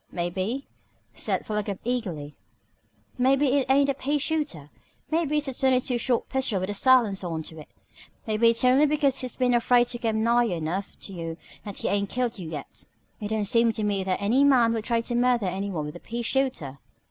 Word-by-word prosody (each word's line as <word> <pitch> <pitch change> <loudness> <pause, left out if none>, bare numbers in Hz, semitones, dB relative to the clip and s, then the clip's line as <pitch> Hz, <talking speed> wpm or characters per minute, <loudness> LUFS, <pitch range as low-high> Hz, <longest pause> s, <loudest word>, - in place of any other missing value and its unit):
"Maybe," 185 +9 -2 0.5
said - - -2
Philo 210 -1 -1
Gubb 200 -2 -4
eagerly, 180 -12 -3 0.8
"maybe 270 +2 +3
it 270 -1 +1
ain't 275 +1 +4
a 275 - +1
pea 280 +2 -1
shooter. 285 - -3 0.4
Maybe 310 -2 +1
it's 300 -1 -1
a 270 - -3
twenty 260 0 +3
two 245 -1 -2
short 240 0 0
pistol 265 -7 0
with 185 +2 -3
a - - -3
silencer 210 -5 +3
onto 160 -1 -6
it. 150 - -11 0.6
Maybe 220 +1 +3
it's 230 +2 +1
only 265 +4 +5
because 285 -2 +1
he's 255 -2 -4
been 250 -1 +1
afraid 240 0 +3
to 240 - -3
come 220 -2 0
nigh 240 +1 +3
enough 175 0 -3
to 195 - -9
you 165 -2 -5 0.3
that 205 -2 -7
he - - -2
ain't 200 0 0
killed 240 -3 -2
you 170 -3 -6
yet. 150 -4 -8 0.3
It 210 - -4
don't 215 -1 -1
seem 230 +1 +3
to 215 - -3
me 200 -2 0
that 185 -1 -1
any 230 +7 +3
man 250 -5 +4
would 225 -1 -3
try 235 -2 +1
to 240 - -5
murder 240 -2 +2
any 190 +2 -2
one 160 -6 -3
with 150 - -7
a - - -8
pea 235 +5 -5
shooter." 230 - -1
230 Hz, 210 wpm, -26 LUFS, 195-260 Hz, 0.8 s, only